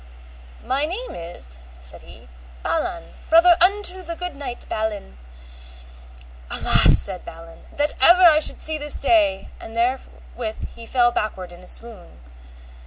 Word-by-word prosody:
My 275 +3 -1
name 440 +10 -6
is, 165 - -10 0.2
said 65 -1 -12
he, 60 0 -16 0.4
Balan, 340 +1 -3 0.2
brother 340 +2 +6
unto 375 0 +1
the 335 -1 -7
good 360 -3 -7
knight, 260 -4 -8
Balin. 210 - -5 1.3
Alas, - - +4
said 180 - +1
Balin, 165 0 -13
that 295 +1 -1
ever 350 +6 +8
I 315 -3 +7
should 310 - +2
see 315 -1 -2
this 295 0 -3
day, 300 -1 +1
and 225 - -11
therewith 240 -2 -4
he 230 -1 -12
fell 240 -1 +2
backward 190 -6 -4
in 175 - -14
a - - -16
swoon. 220 - -8
260 Hz, 140 wpm, -21 LUFS, -, 1.3 s, ever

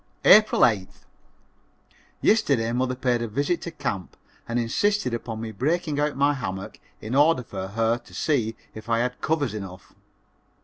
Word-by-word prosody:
April 215 0 +7
8th. 105 -6 +1 1.2
Yesterday 140 - +2
mother 125 +1 0
paid 125 -2 0
a 115 - -2
visit 145 +10 -1
to - - -5
camp 115 - -5 0.3
and 115 - -2
insisted 125 - 0
upon 115 -1 -4
me 110 0 -5
breaking 150 - -1
out 150 -2 0
my 140 +1 +3
hammock 95 -8 -6 0.2
in 110 +3 -5
order 145 -1 +4
for 95 -4 -6
her 115 +3 0
to - - -19
see 115 -7 0 0.2
if 110 +1 -10
I 115 - +2
had 125 +2 -2
covers 150 -6 0
enough. 95 -3 -8
125 Hz, 160 wpm, -25 LUFS, 110-145 Hz, 1.2 s, April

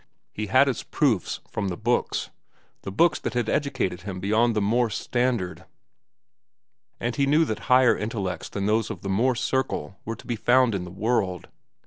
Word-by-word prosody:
He 105 0 -4
had 130 +6 +5
his 130 - -1
proofs 125 - 0
from 105 -2 -3
the 90 -2 -3
books, 120 +2 -1 0.5
the 95 - -6
books 165 - +3
that - - -4
had 120 -2 0
educated 125 -12 -1
him 95 -1 -6
beyond 110 +4 +2
the - - +2
Morse 110 +2 +1
standard. 115 -9 -1 1.4
And 120 0 -2
he 140 +2 +1
knew 155 +3 +4
that 110 -7 -3
higher 125 -1 +6
intellects 100 -6 -4
than 100 -1 -3
those 110 +1 +1
of - - -7
the 100 - -3
Morse 120 +5 +1
circle 100 - -2
were 115 - -4
to - - -15
be 120 - -2
found 125 +1 +3
in 95 -2 -2
the - - -8
world. 95 -2 -1
110 Hz, 180 wpm, -25 LUFS, 95-125 Hz, 1.4 s, higher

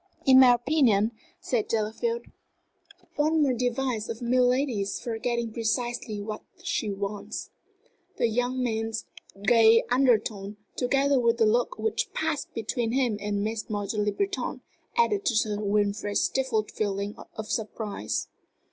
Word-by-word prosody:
"In 260 -1 +8
my 250 -2 +8
opinion," 240 -5 +2 0.3
said 255 - -1
Delafield, 225 - -1 0.9
"one 310 +1 +3
more 270 -3 +2
device 245 -2 -1
of 230 -1 -4
milady's 250 -3 +1
for 225 -2 -4
getting 235 -1 -1
precisely 240 -1 -2
what 215 +1 -5 0.2
she 215 - -1
wants." 200 +1 -5 0.7
The - - +2
young 245 +3 0
man's 225 -1 -2 0.4
gay 230 0 +6
undertone, 215 -5 +2 0.2
together 275 +2 +2
with 235 -1 +2
the 225 - +4
look 245 - +1
which 445 - -1
passed - - -2
between 235 -3 -1
him 250 -5 +1
and 205 0 -1
Mademoiselle 210 -1 -2
Le 210 - +1
Breton, 395 - -2 0.4
added 420 -4 +3
to 235 - +2
Sir 210 -1 +1
Wilfrid's 205 0 0
stifled 250 -5 0
feeling 200 0 -2 0.2
of 220 0 -5
surprise. 215 -1 -3
230 Hz, 130 wpm, -27 LUFS, 210-255 Hz, 0.9 s, In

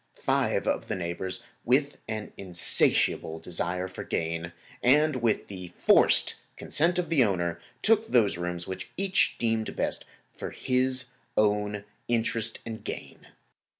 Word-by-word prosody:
Five - - +1
of - - 0
the - - -1
neighbors, 90 +1 -3 0.2
with 140 +4 +2
an 110 -1 -4
insatiable 85 -3 +1
desire 90 +2 -2
for 95 - -7
gain, 85 +1 -2 0.3
and 150 +3 +4
with 115 -3 +1
the 90 -3 -8
forced - - +5 0.2
consent 170 +4 +2
of 175 -3 0
the 150 -6 +5
owner, 85 -5 0 0.2
took 225 0 +4
those 115 -5 +3
rooms 85 0 -3
which 95 -1 -6
each 195 0 +2
deemed 115 -1 0
best - - -2 0.3
for - - -5
his 130 0 0 0.3
own 105 -1 +2 0.2
interest 115 -1 0
and 110 -1 -6
gain. - - -7
110 Hz, 135 wpm, -28 LUFS, 90-130 Hz, 0.3 s, forced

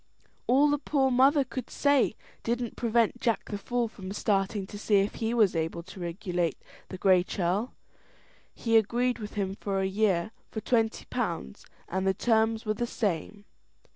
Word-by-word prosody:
All 275 +4 +5
the 290 - +1
poor 270 -2 +1
mother 275 +3 +5
could 255 0 -6
say 285 -6 +2 0.3
didn't 235 0 -2
prevent 235 0 +1
Jack 230 -3 0
the 205 - -2
Fool 240 +3 -1
from 195 -4 -9
starting 200 0 0
to 205 +1 -9
see 210 0 +2
if 200 +1 +3
he 225 0 -2
was 215 -7 +3
able 165 +1 -2
to 185 +2 -12
regulate 175 -1 -2 0.3
the 185 - -6
Gray 185 -1 +5
Churl. 185 +6 -1 0.8
He 230 -1 +3
agreed 240 +3 +1
with 210 -1 -7
him 195 -2 -1
for 195 -1 -2
a 190 - +1
year 190 -1 +1 0.2
for 220 - -4
twenty 225 -1 0
pounds, 65 0 -4 0.2
and 190 +2 -1
the 190 - +2
terms 225 +1 +2
were 215 - +1
the 240 +3 -2
same. 205 -1 -3
215 Hz, 170 wpm, -28 LUFS, 190-240 Hz, 0.8 s, All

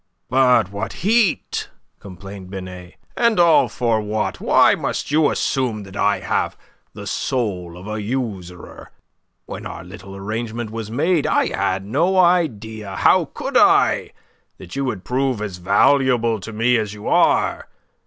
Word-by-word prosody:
"But 125 -6 +3
what 100 -1 -4
heat!" 220 -4 +1 0.3
complained 95 0 -10
Binet, 90 -2 -9 0.2
"and 235 -4 +2
all 170 -2 +5
for 115 -3 0
what? 105 0 -3
Why - - +5
must - - -3
you 150 0 +4
assume 120 -6 -1
that 95 0 -12
I 100 0 +1
have - - -1 0.4
the - - -8
soul 90 -9 -3
of 90 - -11
a 105 0 -4
usurer? 100 -7 -5 0.6
When - - -7
our 85 - -8
little 95 +1 -11
arrangement 110 +3 -4
was 110 -1 -6
made, 155 +7 +1
I - - +1
had 95 +1 -1
no 165 - +1
idea 110 - +1
how - - +4
could - - -7
I? - - +4 0.4
that 85 - -11
you 140 0 -1
would 105 -8 -4
prove 130 +1 -1
as 100 -4 -5
valuable 115 +4 +2
to 105 - -8
me 115 +3 +2
as 105 -2 -3
you 105 - -9
are? - - +2
110 Hz, 150 wpm, -20 LUFS, 95-130 Hz, 0.6 s, all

